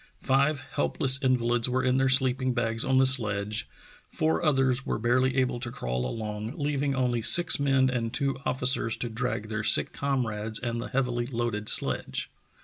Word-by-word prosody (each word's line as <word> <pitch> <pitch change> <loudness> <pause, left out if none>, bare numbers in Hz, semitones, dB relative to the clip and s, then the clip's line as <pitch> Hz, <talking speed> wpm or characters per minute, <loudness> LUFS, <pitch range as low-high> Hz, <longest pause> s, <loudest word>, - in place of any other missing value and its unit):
Five 140 +1 +1
helpless 135 0 +1
invalids 120 -2 +1
were 130 +1 0
in 130 0 +2
their 135 0 +2
sleeping 130 -1 +2
bags 115 -1 -1
on 130 0 +1
the 135 - +5
sledge, 105 -4 0 0.4
four 160 +2 -1
others 135 -4 +2
were - - -2
barely 125 +3 +1
able 130 -2 0
to 120 0 -4
crawl 60 - -3
along, 105 - -5
leaving 145 -2 -1
only 125 -2 0
six 165 +11 +5
men 135 -2 +2
and 120 -3 -2
two 135 -1 -2
officers 125 -3 -1
to 120 - -4
drag 110 -2 -3
their 110 0 -3
sick - - +3
comrades 110 -6 -2
and 120 -1 -3
the - - -6
heavily 125 -2 -1
loaded 115 -4 -2
sledge. - - -1
125 Hz, 170 wpm, -27 LUFS, 115-135 Hz, 0.4 s, the